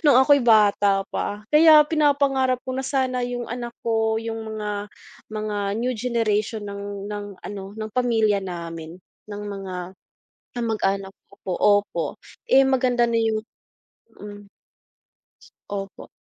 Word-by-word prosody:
nung 280 - +7
ako'y 285 +1 +5
bata 205 -3 +4
pa. 205 +1 -3
Kaya 305 -1 +8
pinapangarap 275 -4 +2
ko 260 - -4
na - - -1
sana 260 -2 0
yung 245 0 -4
anak 240 0 -6
ko, 225 -1 +1
yung 225 0 -4 0.2
mga 210 -1 -4 0.4
mga 215 -1 -3 0.2
new 250 +2 0
generation 220 -2 -1
ng 200 0 -6
ng 205 0 -5 0.2
ano, 200 +1 -7
ng 215 0 -5
pamilya 225 -5 +2
namin, 170 -2 -7 0.3
ng 205 0 -6
mga 195 -2 -6 0.8
kamag-anak 200 -4 -1 0.2
ko 200 - -18
po, 185 - -2 0.3
opo, 170 -5 -3 0.4
eh, 270 +1 +6
maganda 255 -2 +2
na 230 -1 +1
yung 220 -1 0 0.7
mm. 205 -1 -11 1.2
Opo. 195 -1 -6
220 Hz, 130 wpm, -23 LUFS, 200-250 Hz, 1.2 s, Kaya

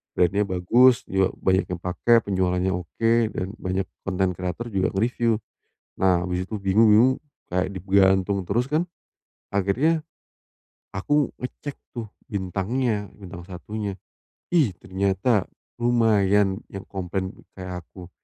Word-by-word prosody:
Brand-nya 95 +4 +3
bagus, 120 +8 +4
juga 95 0 +2
banyak 95 +1 +2
yang 85 - -12
pake, 90 +6 +1
penjualannya 95 -1 +1
oke, 90 +6 0 0.2
dan 95 - -2
banyak 95 0 -1 0.2
konten 95 -1 +1
kreator 90 +6 -4
juga 95 -2 +1
nge-review. 115 +2 +1 0.7
Nah, 90 -2 +3
habis 90 0 -1
itu 110 - -4
bingung 100 +3 +4
bingung, 120 +5 +6 0.4
kayak 90 +1 +1
digantung 95 +1 +3
terus 120 +5 +1
kan. 165 +4 +1 0.6
Akhirnya, 130 - +1 0.9
aku 145 +9 +1
ngecek 135 +3 -6 0.2
tuh, 115 -4 -5 0.2
bintangnya, 105 +3 -1
bintang 90 -3 -10
1-nya. 100 +2 -5 0.6
Ih, 145 - +3
ternyata 100 +3 +1 0.3
lumayan 105 -5 +3
yang 100 - -7
komplain, 95 0 -3 0.2
kayak 90 -3 -7
aku. 90 -2 -12
95 Hz, 120 wpm, -24 LUFS, 95-115 Hz, 0.9 s, bingung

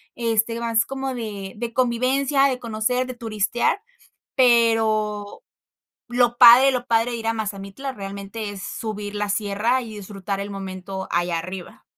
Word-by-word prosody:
Este, 230 -1 0
más 230 -1 +1
como 270 0 -4
de 205 -5 -6
de 230 +1 -5
convivencia, 260 +3 +2
de 255 -2 -2
conocer, 235 +2 -1
de 255 - -5
turistear, 230 - -1 0.5
pero 225 - +2 0.7
lo 240 0 +2
padre 250 +3 +9
lo 250 -2 -2
padre 230 0 +2
de 240 - -3
ir 225 - -6
a 225 - +2
Mazamitla, 205 +4 -5
realmente, 200 0 -6
es 195 -2 -8
subir 210 -2 -5
la 210 0 -2
sierra 210 +5 0
y 220 -3 -8
disfrutar 200 -1 -5
el 200 - -4
momento 190 -1 -6
allá 175 0 0
arriba. 180 +2 -8
225 Hz, 150 wpm, -23 LUFS, 200-245 Hz, 0.7 s, padre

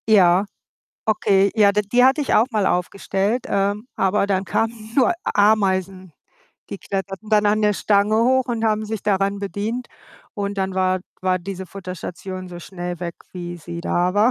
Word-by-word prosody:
Ja, 190 -2 +5 0.6
okay. 200 -2 +3
Ja, 210 -3 +5
d 210 +1 +1
die 245 +1 +6
hatte 265 +3 +4
ich 285 - 0
auch 225 - +5
mal 210 -4 +1
aufgestellt, 195 +5 -1
ähm, 200 +3 0
aber 195 +1 +2
dann 195 -1 0
kamen 225 +3 -2
nur 265 +5 +4
Ameisen. 190 -3 +1 0.6
Die 200 - -5
kletterten 195 +2 -5
dann 210 -1 +3
an 210 +1 +2
der 210 0 +4
Stange 205 +1 +2
hoch 255 +3 +3
und 230 -3 -2
haben 215 -1 +1
sich 220 -2 -4
daran 200 0 +1
bedient. 215 +5 -3 0.5
Und 200 -1 -3
dann 190 -1 -1
war 185 0 +1 0.2
war 185 0 +2
diese 190 +1 -6
Futterstation 185 0 -7
so 175 -1 -8
schnell 175 -1 -6
weg, 170 -1 -4 0.2
wie 175 -1 -6
sie 170 +1 -7
da 180 +2 0
war. 210 +4 +4
200 Hz, 170 wpm, -21 LUFS, 185-215 Hz, 0.6 s, die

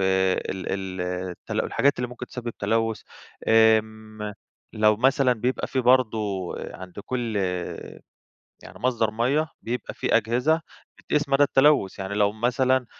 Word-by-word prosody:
ال 95 0 0
ال 95 -1 -4 0.3
التل 90 - -4
الحاجات 140 -2 +1
اللي 125 - -2
ممكن 125 0 -8
تسبب 120 -1 -6
تلوث، 115 -1 0 0.5
امم 110 -1 +2 0.4
لو 105 0 +3
مثلًا 130 +2 +3
بيبقى 125 +2 -1
في 130 - -1
برضه 125 -3 +3 0.4
عند 90 0 -9
كل 120 -4 -2 1.3
يعني - - -12
مصدر 115 -3 +1
مَيَّة، 135 +8 +1
بيبقى 125 +2 -4
في - - +1
أجهزة 125 +9 +1 0.4
بتقيس 150 -1 -1
مدى 140 +1 +4
التلوث، 140 -8 +3
يعني 95 +1 -4
لو 105 0 +2
مثلًا 125 +3 +1
115 Hz, 130 wpm, -25 LUFS, 105-130 Hz, 1.3 s, مدى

